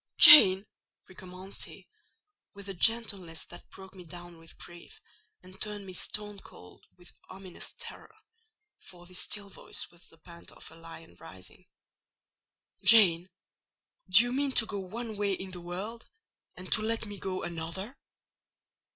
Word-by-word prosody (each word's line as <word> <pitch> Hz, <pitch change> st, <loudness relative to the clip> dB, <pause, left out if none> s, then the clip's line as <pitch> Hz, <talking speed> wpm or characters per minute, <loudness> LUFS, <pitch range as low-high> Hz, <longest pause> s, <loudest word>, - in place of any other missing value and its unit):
"Jane!" 195 Hz, -10 st, +9 dB, 0.4 s
recommenced 185 Hz, +1 st, -10 dB
he, -, -, -15 dB, 0.7 s
with 200 Hz, 0 st, -12 dB
a 195 Hz, -, -6 dB
gentleness 195 Hz, -5 st, +1 dB
that -, -, -15 dB
broke 190 Hz, 0 st, -15 dB
me 185 Hz, -2 st, -13 dB
down 175 Hz, 0 st, -13 dB
with 165 Hz, 0 st, -16 dB
grief, 175 Hz, 0 st, -14 dB, 0.4 s
and 185 Hz, +1 st, -16 dB
turned 210 Hz, -1 st, -2 dB
me 185 Hz, -, -11 dB
stone 210 Hz, +2 st, -4 dB
cold 90 Hz, -, -15 dB
with 175 Hz, 0 st, -19 dB, 0.2 s
ominous 190 Hz, -1 st, -9 dB
terror—for 435 Hz, -, -15 dB
this 180 Hz, 0 st, -6 dB
still 205 Hz, -1 st, -3 dB
voice 195 Hz, -, -7 dB
was 175 Hz, 0 st, -19 dB
the 165 Hz, -, -21 dB
pant 170 Hz, +1 st, -14 dB
of -, -, -14 dB
a -, -, -15 dB
lion 165 Hz, -, -14 dB
rising—"Jane, 180 Hz, -, 0 dB, 0.8 s
do 185 Hz, +6 st, +7 dB
you 245 Hz, 0 st, -4 dB
mean 275 Hz, 0 st, -2 dB
to 225 Hz, -, +3 dB
go 205 Hz, -2 st, -5 dB
one 220 Hz, +3 st, -8 dB
way 200 Hz, -1 st, -1 dB
in 190 Hz, 0 st, -7 dB
the 180 Hz, -1 st, -9 dB
world, 195 Hz, +7 st, -8 dB, 0.5 s
and 185 Hz, +1 st, -10 dB
to 215 Hz, -, +4 dB
let 225 Hz, +1 st, -2 dB
me 205 Hz, -2 st, -10 dB
go 185 Hz, -1 st, -5 dB
another?" 175 Hz, +8 st, -7 dB
190 Hz, 145 wpm, -28 LUFS, 175-215 Hz, 0.8 s, Jane